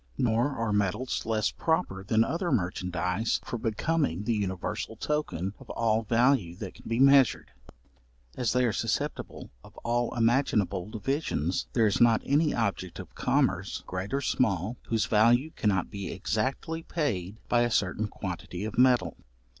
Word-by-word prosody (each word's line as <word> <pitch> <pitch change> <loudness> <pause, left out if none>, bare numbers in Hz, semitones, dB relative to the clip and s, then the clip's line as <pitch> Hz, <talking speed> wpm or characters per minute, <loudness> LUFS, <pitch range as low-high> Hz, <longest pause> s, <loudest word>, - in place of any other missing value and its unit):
Nor 120 +3 +2
are 115 -3 -1
metals 105 +6 -1
less 110 -1 +1
proper 160 - -1
than 110 +3 +3
other 170 +6 -2
merchandize 90 - 0
for 120 - -4
becoming 110 - 0
the 115 - 0
universal 95 -4 -3
token 100 - -2
of - - -15
all 115 -1 +1
value 115 -5 +2
that 95 0 -7
can - - -12
be 115 +1 0
measured: 135 - +5 0.8
as 125 -3 0
they 125 0 +2
are 115 - +1
susceptible - - -3
of - - -16
all 120 0 0
imaginable 115 -6 +1
divisions, 110 - -2
there 115 -3 +3
is 105 +1 +1
not 115 -2 +5
any 150 +2 +3
object 95 -6 -2
of - - -9
commerce, - - 0
great 90 +2 -5
or 140 +1 0
small, 110 - 0
whose 115 -2 +1
value 120 +7 +3
cannot 95 - 0
be 100 -1 -5
exactly 130 - -2
paid 110 - -2
by 120 - +3
a 120 - +2
certain 105 0 0
quantity 95 0 -6
of 110 +2 -3
metal. 125 -1 +4
110 Hz, 155 wpm, -28 LUFS, 95-125 Hz, 0.8 s, measured